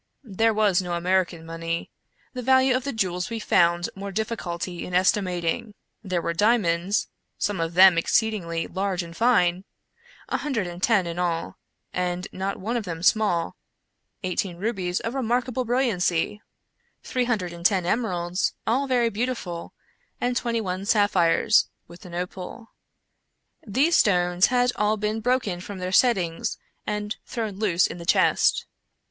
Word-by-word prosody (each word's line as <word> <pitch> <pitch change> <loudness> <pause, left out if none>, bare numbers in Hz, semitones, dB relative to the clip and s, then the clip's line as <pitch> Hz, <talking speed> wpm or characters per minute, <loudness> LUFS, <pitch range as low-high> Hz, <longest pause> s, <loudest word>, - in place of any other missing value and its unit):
There 225 0 +1
was 210 -4 +2
no 180 -1 -4
American 175 -1 0
money. 165 0 -4 0.4
The 250 - -4
value 260 +1 +4
of 255 - -2
the 280 - -1
jewels 185 -4 -1
we 230 - -3
found 175 -4 +2
more 200 +1 -6
difficulty 185 -5 -3
in 180 - -5
estimating. 185 +3 +1 0.3
There 185 -4 -2
were 170 - -1
diamonds 200 -2 +2
— - - -52
some 205 -3 -4
of 165 +1 -3
them 185 -2 +8
exceedingly 170 -4 0
large 190 -2 -2
and 170 0 -10
fine 185 -6 +3 0.3
— 485 +1 -25
a - - 0
hundred 260 -10 -2
and 175 0 -7
ten 210 -5 +3
in 170 +1 -4
all, 170 -2 -2 0.3
and 180 0 -2
not 195 +1 -3
one 230 +6 -2
of 230 - -2
them 170 -3 -6
small; 185 -5 +2 0.7
eighteen 185 -1 -2
rubies 185 -3 -2
of 230 - -3
remarkable 250 0 -1
brilliancy; 210 -6 0 0.3
— 475 0 -45
three 250 -1 -1
hundred 200 -8 -1
and 170 0 -10
ten 185 -1 +3
emeralds, 180 -4 -1
all 265 +5 +1
very 245 -3 +2
beautiful; 205 -7 -3 0.5
and 245 0 0
twenty 235 -1 0
one 185 -1 -3
sapphires, 200 -5 +3 0.2
with 175 +3 -13
an 170 - -9
opal. 185 +6 -6 1.0
These 285 +11 +3
stones 180 -2 +3
had 245 0 +2
all 210 +1 +2
been 210 +1 -1
broken 235 -7 0
from 200 +2 -7
their 185 0 -4
settings 185 -8 +2 0.3
and 210 0 -3
thrown 220 -5 -4
loose 185 -5 +2
in 175 - -5
the 170 - -8
chest. - - +3
195 Hz, 155 wpm, -25 LUFS, 175-230 Hz, 1.0 s, them